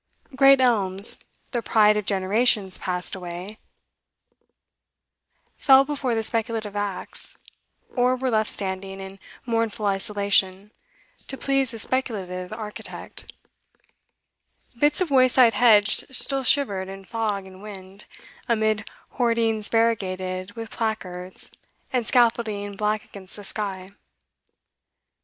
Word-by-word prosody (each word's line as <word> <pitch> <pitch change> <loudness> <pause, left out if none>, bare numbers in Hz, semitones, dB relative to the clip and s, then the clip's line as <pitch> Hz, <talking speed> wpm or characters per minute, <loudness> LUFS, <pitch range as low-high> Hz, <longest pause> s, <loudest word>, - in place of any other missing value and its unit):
Great 275 0 +7
elms, 200 -5 +4 0.3
the 240 - -1
pride 210 -2 +4
of 210 -2 -2
generations 200 0 +2
passed 180 -1 -2
away, 180 +3 -7 2.0
fell 270 0 +6
before 270 -4 -2
the 225 - -1
speculative 220 -2 -2
axe, 205 -2 -4 0.6
or 250 0 +3
were 255 0 -2
left 215 -1 +1
standing 195 0 -3
in 195 0 -9 0.3
mournful 230 -2 -1
isolation 200 -1 +1 0.6
to 270 - -5
please 275 -3 0
a 230 - -7
speculative 195 -7 -3
architect; 215 -1 -8 1.5
bits 295 +6 +2
of 350 -5 0
wayside 255 -3 +5
hedge 215 -2 +4
still 270 +1 -1
shivered 205 -9 +1
in 195 0 -9
fog 210 -2 -2
and 190 0 -13
wind, 195 -1 -10 0.4
amid 220 -1 +1 0.3
hoardings 230 -3 +1
variegated 190 -4 -1
with 225 0 -8
placards 185 -5 -4 0.4
and 245 -3 0
scaffolding 225 -4 +1
black 210 +1 -1
against 190 -2 -12
the 205 - -9
sky. 190 -3 -4
215 Hz, 110 wpm, -24 LUFS, 195-235 Hz, 2.0 s, Great